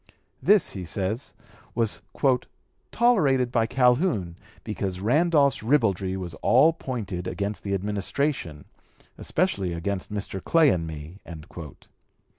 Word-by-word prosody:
This, 210 -1 +4
he 95 - -6
says, 100 +8 -3 0.4
was 115 -2 0 0.9
"tolerated 145 - +3
by 115 -2 +2
Calhoun, 125 - +2 0.3
because 100 -4 -3
Randolph's 140 - +3
ribaldry 100 -7 +1
was 90 -3 -5
all 145 +7 +5
pointed 105 - -5
against 100 -1 -3
the 100 -1 -1
Administration, 100 - -2 0.5
especially 100 - 0
against 95 +4 -3
Mr. 100 -2 -5
Clay 165 -3 +5
and 85 -2 -1
me." 80 +4 -8
105 Hz, 105 wpm, -25 LUFS, 95-140 Hz, 0.9 s, all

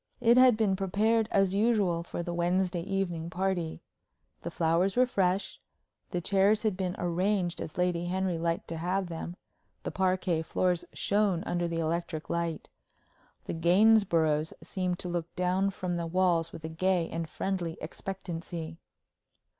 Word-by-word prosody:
It 235 +1 +5
had 255 -3 +6
been 210 -4 +2
prepared 210 +4 +1
as 195 -1 +2
usual 200 -5 +2
for 170 0 -5
the 175 0 -4
Wednesday 175 +1 0
evening 175 -3 -2
party. 180 -2 -2 0.6
The - - -4
flowers 170 +4 +1
were 250 +1 +5
fresh; 195 -5 0 0.5
the 180 - -2
chairs 200 +4 +3
had 215 -4 +1
been 185 -1 -2
arranged 175 0 0
as 155 - -7
Lady 180 -1 +1
Henry 185 -1 -1
liked 165 0 -1
to 165 - -4
have 180 +2 -1
them; 170 +1 -5 0.5
the - - -3
parquet 185 -3 +1
floors 175 +2 0
shone 200 -4 +1
under 175 -3 -1
the 165 0 -3
electric 165 0 -2
light; 170 -2 -2 0.8
the - - -4
Gainsboroughs 170 -4 +3
seemed 180 -2 -2
to 180 - -5
look 175 -1 -4
down 185 +2 +1
from 180 -2 -3
the 170 -1 -2
walls 170 -2 +2
with 160 - -10
a - - -3
gay 175 +1 +1
and 165 -1 -4
friendly 175 -3 -3
expectancy. 170 -2 -6
180 Hz, 155 wpm, -29 LUFS, 170-195 Hz, 0.8 s, had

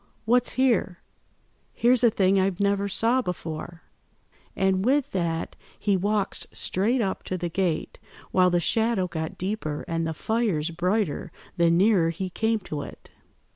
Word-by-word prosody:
What's 245 +2 +2
here? 240 -8 +1 0.8
Here's 245 +1 +3
a 235 - +7
thing 195 -2 +2
I 190 +1 +2
never 200 0 +1
saw 230 +6 +2
before,' 170 -3 -6 0.7
and 190 0 +1
with 270 +4 +2
that 170 -3 -2 0.2
he 205 -2 +1
walks 205 +2 0
straight 230 +7 0
up 195 -3 -2
to 185 - -3
the 175 -1 -3
gate, 175 -2 -2 0.3
while 185 -1 +4
the 175 -1 +2
shadow 220 +1 +1
got 160 -2 -5
deeper 185 -6 -3
and 165 -2 -1
the 160 - -3
fires 200 -7 -1
brighter 180 -1 -1 0.2
the 170 -1 +3
nearer 180 0 +4
he 180 +3 -4
came 220 +4 +1
to 150 -5 -5
it. - - -11
190 Hz, 150 wpm, -25 LUFS, 170-220 Hz, 0.8 s, a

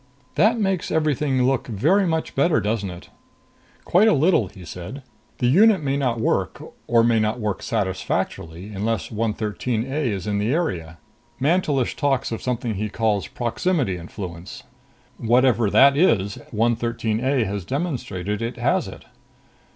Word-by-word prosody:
"That 215 +9 +3
makes 195 -4 0
everything 150 -4 +1
look 130 0 +1
very 155 - +2
much 160 -1 -1
better, 155 +4 +3
doesn't 105 -2 -1
it?" 90 0 -10 0.8
"Quite 195 +6 +4
a 220 - +5
little," 150 - +3
he 95 -2 -13
said. 90 - -8 0.3
"The 125 - -1
unit 190 - +5
may 135 -1 0
not 125 -5 0
work, 110 - 0 0.3
or 115 -1 +4
may 115 -1 +3
not 110 +3 0
work 105 -3 -2
satisfactorily, 95 -1 -3
unless 110 +2 -2
113 110 +1 -2
A 135 - -4
is 100 -3 -3
in 105 -1 -1
the 105 +4 0
area. 90 - -2 0.4
Mantelish 145 -3 +1
talks 135 -4 0
of 115 - -4
something 120 -2 -2
he 105 +2 -3
calls 105 -2 0
proximity 120 - -1
influence. 85 0 -8 0.5
Whatever 120 -2 +3
that 140 +6 +6
is, 105 - +2
113 115 0 0
A 130 -2 +2
has 100 -1 -3
demonstrated 115 - -3
it 115 +2 -3
has - - +1
it." - - -11
115 Hz, 150 wpm, -22 LUFS, 105-140 Hz, 0.8 s, that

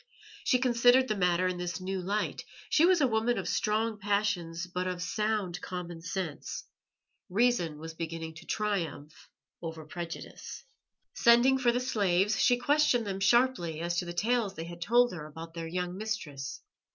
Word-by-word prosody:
She 255 - +4
considered 245 +1 +4
the 215 - 0
matter 180 -1 +2
in 180 -1 -2
this 175 -2 -3
new 190 0 -3
light. 200 +4 -2 0.3
She 325 +3 +5
was 365 -3 +4
a 270 - +5
woman 225 +1 +1
of - - -3
strong 215 0 0
passions 200 -5 0
but 180 0 -3
of 180 -1 -3
sound 210 -2 -1
common 175 -2 -6
sense; 180 -3 -4 0.7
reason 195 -6 +2
was 160 +1 -7
beginning 165 0 -5
to 165 - -13
triumph 175 -8 -3 0.3
over 160 -2 -6
prejudice. 170 - -7 0.5
Sending 240 +3 +5
for 245 -2 +4
the 245 - 0
slaves, 200 -5 +1
she 245 -2 +5
questioned 255 -2 +3
them 195 -1 -3
sharply 200 -6 +2
as 170 +1 -1
to 180 - -3
the 175 - -5
tales 215 +2 0
they 165 - -5
had 170 0 -9
told 240 +5 +4
her 155 -3 -6
about 165 +2 -9
their 165 -1 -5
young 180 +1 -3
mistress. 150 -10 -4
190 Hz, 165 wpm, -30 LUFS, 170-230 Hz, 0.7 s, She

